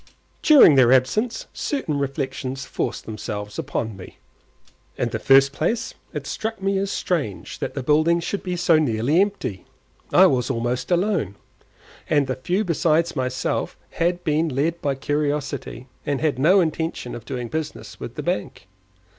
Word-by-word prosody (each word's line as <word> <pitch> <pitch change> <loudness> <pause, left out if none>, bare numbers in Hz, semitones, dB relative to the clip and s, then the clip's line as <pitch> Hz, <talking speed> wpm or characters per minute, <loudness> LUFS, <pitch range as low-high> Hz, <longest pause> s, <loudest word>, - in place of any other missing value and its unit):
During 290 - +8
their 130 -3 +5
absence 215 - +2
certain 165 - -2
reflections 135 -1 -3
forced - - -3
themselves 105 -1 -5
upon 110 -2 -3
me. 95 -1 -12 0.8
In - - 0
the - - -3
first 135 0 +5
place, 195 +11 -1 0.2
it - - -5
struck 220 -1 -4
me 195 0 0
as 195 0 -1
strange 155 - -3
that - - -4
the 135 - -3
building 155 +5 +3
should 195 +4 -3
be 180 -1 -3
so 170 -2 +4
nearly 140 +4 +2
empty; 200 - -2 0.5
I 190 - +7
was 130 -7 +2
almost 120 0 -2
alone, 175 - +1 0.7
and 145 -2 +3
the 130 - -2
few 180 +10 -1
besides 170 -2 +1
myself 130 -2 -2
had 175 +1 0
been 155 +1 +1
led 155 +5 -1
by 140 -2 0
curiosity, 145 -3 -2 0.2
and 145 -3 -1
had 150 -5 0
no 185 +8 +5
intention 160 -6 -2
of 120 - -7
doing 125 0 -4
business 155 +4 -5
with - - -7
the - - -5
bank. 95 - -3
150 Hz, 155 wpm, -23 LUFS, 130-175 Hz, 0.8 s, During